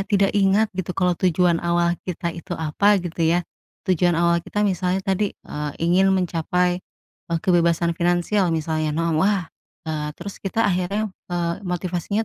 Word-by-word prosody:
tidak 200 -1 +3
ingat 205 +2 +3
gitu 180 -1 -4
kalau 180 -1 +2
tujuan 175 -1 +2
awal 170 0 +2 0.2
kita 170 -1 -2
itu 170 +1 -6
apa 180 +7 +2
gitu 175 0 -5
ya. 170 +2 +2 0.4
Tujuan 175 -2 +2
awal 170 0 +3
kita 210 +5 -2
misalnya 185 -1 0
tadi, 195 0 0
eee, 150 -1 -5
ingin 180 +3 +3
mencapai, 180 0 0 0.5
eee, 170 -1 0
kebebasan 170 -1 +3
finansial 175 +3 +1
misalnya 155 -1 -1
no, 165 -1 +1
wah, 195 0 +2 0.4
eee, 155 -2 -3
terus 195 +3 -8
kita 225 +4 0
akhirnya, 195 +3 0 0.2
eee, 175 -1 -1
motivasinya 180 +3 -2
175 Hz, 150 wpm, -22 LUFS, 170-190 Hz, 0.5 s, tidak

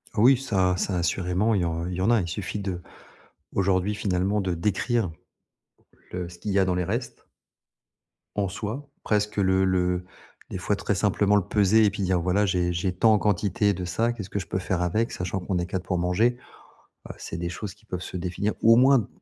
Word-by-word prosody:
Oui, 125 +5 +6
ça 95 -8 +1
ça 95 0 -1
assurément, 90 +5 +1
il 95 - +1
y - - +1
en 85 0 -2
il 90 - -4
y 95 - -3
en 95 - +2
a. 120 -3 +4
Il 85 - -4
suffit 95 +4 -4
de 95 -3 -3 0.8
aujourd'hui, 95 +1 +1
finalement, 100 +1 0
de 95 -3 -1
décrire, 105 +4 0 1.0
le 90 -1 -4
ce 85 0 -13
qu'il 105 - -4
y 100 - +2
a 95 - +5
dans 95 -1 0
les 90 0 0
restes. - - -4 1.1
En 100 -2 +1
soi, 115 +9 -5
presque 105 0 0
le 95 -1 +3
le 90 -1 +1 0.5
des - - -4
fois 95 +3 0
très 100 - -1
simplement 105 +1 +2
le - - +3
peser 105 +1 +4
et - - +5
puis 100 0 -4
dire, 95 -1 +2
voilà, 90 +4 +2
j'ai 90 -2 0
j'ai 90 +2 -1
tant 110 +4 +4
en - - +5
quantité 100 0 +1
de 90 -1 -4
ça, 110 +7 0
qu'est-ce 105 -5 -7
que 100 - -2
je 95 - -6
peux 95 - -2
faire 90 -1 -1
avec 105 +7 0
sachant 90 +1 -3
qu'on 95 0 -2
est 85 - -1
4 90 0 -4
pour 90 - -1
manger, 95 +8 +2 0.7
heu, - - -6
c'est - - -6
des 85 0 -2
choses 90 +2 -6
qui 105 +1 -27
peuvent 90 -4 -4
se 90 - -6
définir 90 +4 -2
ou 115 +1 +7
au - - +4
moins 130 -3 +5
95 Hz, 220 wpm, -26 LUFS, 90-105 Hz, 1.1 s, ou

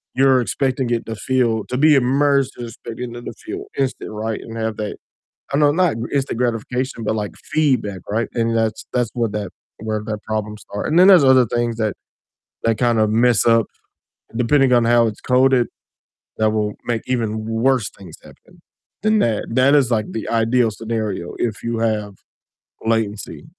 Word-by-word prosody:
you're 130 -1 +4
expecting 130 0 -1
it 120 -1 -1
to 115 - -5
feel 115 -2 0
to 125 - -2
be 150 +3 +5
immersed 140 +1 +2
and 120 - -5
expecting 120 +1 -7
it 120 - -7
to - - -6
feel - - -5
instant, 130 -5 -2
right? 110 +1 -4
And 115 0 -8
have 110 -1 -2
that 105 -1 -4 0.6
I 140 - +1
know 145 -1 +4
not 175 -4 +2
gr 115 - -4
instant 135 -4 -1
gratification, 125 +1 -2
but 110 +1 0
like 105 -2 -3 0.2
feedback, 130 -11 +1
right? 115 +3 0
And 115 -1 0
that's 110 -1 -1
that's 120 -3 0
what 115 -4 -1
that 105 -3 -4 0.3
where 110 -1 -3
that 110 -1 -4
problem 105 -1 -3
start, 105 0 -6
and 155 - 0
then 185 - +7
there's 180 -7 +8
other 130 -2 +6
things 120 0 -1
that 110 -2 0 0.7
that 115 -1 +2
kind 120 -2 +2
of 110 - +3
mess 120 +1 +3
up 115 -2 +4 0.7
depending 130 +2 +3
on 120 -1 +4
how 120 0 +4
it's 105 - -7
coded 130 -1 +3 0.7
that 110 -1 +2
will 105 -1 -1
make 115 -2 -1
even 110 -4 -1
worse 115 0 +1
things 95 -5 -12
happen - - -18 0.4
than 215 0 +3
that 110 - 0
that 130 +4 +4
is, 135 -4 +3
like, 110 -2 0
the 110 - -5
ideal 115 +1 +2
scenario 110 -5 -4
if 110 -3 -2
you 115 -1 -2
have 105 -3 -1 0.7
latency 110 +3 -2
115 Hz, 185 wpm, -20 LUFS, 110-130 Hz, 0.7 s, there's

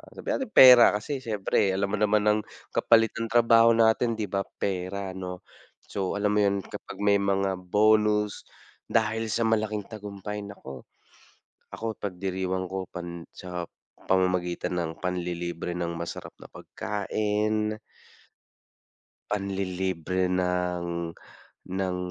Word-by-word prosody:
sabihin - - -2
nating 240 -4 -6
pera, 125 -4 +9
kasi 135 +6 -4
siyempre 100 -4 0
alam 100 +1 -1
mo - - +1
naman 105 0 +3
ang, 105 0 +4 0.3
kapalit 115 -1 +4
ng 115 - -2
trabaho 115 0 +5
natin, 115 +1 +3
'di 110 - -1
ba, 100 0 +1 0.2
pera 95 0 -3
'no. 90 0 -7 0.4
So, 95 -1 -3
alam 105 0 +1
mo 105 - +3
yun, 100 -1 +1
kapag - - -9
may 100 0 +4
mga 100 -1 +1
bonus, 105 +2 +2 0.5
dahil 110 0 +1
sa 115 +2 0
malaking 110 -2 0
tagumpay, 105 -1 -7
naku, 70 -9 -10 0.9
ako 115 -1 -4
ipagdiriwang 95 -1 -3
ko 95 -1 -4
pan 85 -1 -7
sa 90 -2 -6 0.4
pamamagitan 90 -1 +1
ng 80 - -2
panlilibre 85 -1 -3
ng 85 -1 -2
masarap 85 0 -6
na - - -11
pagkain 105 +1 -2 1.5
panlilibre 95 -2 -1
ng, 90 -2 -1 0.6
ng 95 -1 -1
100 Hz, 120 wpm, -27 LUFS, 90-105 Hz, 1.5 s, pera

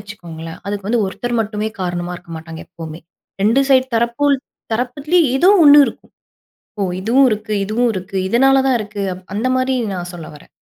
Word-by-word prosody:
வச்சுக்கோங்களேன், 170 -6 -9
அதுக்கு 200 -1 -4
வந்து 230 0 +2
ஒருத்தர் 240 +5 -3
மட்டுமே 215 0 -2
காரணமா 175 -1 -3
இருக்க 175 -1 -16
மாட்டாங்க 160 0 -9
எப்பவுமே. 165 -1 -9 0.4
2 225 +6 +4
சைடு 260 -1 +5
தரப்புல் 235 +5 +1 0.4
தரப்புலயும் 285 +8 +1
ஏதோ 350 +7 +4 0.2
ஒண்ணு 290 0 +9
இருக்கும். - - -9 0.7
ஓ! - - +1 0.2
இதுவும் 245 +7 +4
இருக்கு, 215 0 -3
இதுவும் 230 +4 +1
இருக்கு. 190 +1 -6
இதனால 270 +5 +4
தான் 260 - +3
இருக்கு. 205 -1 -5
அப் 185 +1 -14
அந்த 225 +5 0
மாரி 255 +1 0 0.2
நான் 175 -1 -5
சொல்ல 165 -3 -8
வரேன். 150 - -18
215 Hz, 170 wpm, -18 LUFS, 180-255 Hz, 0.7 s, ஒண்ணு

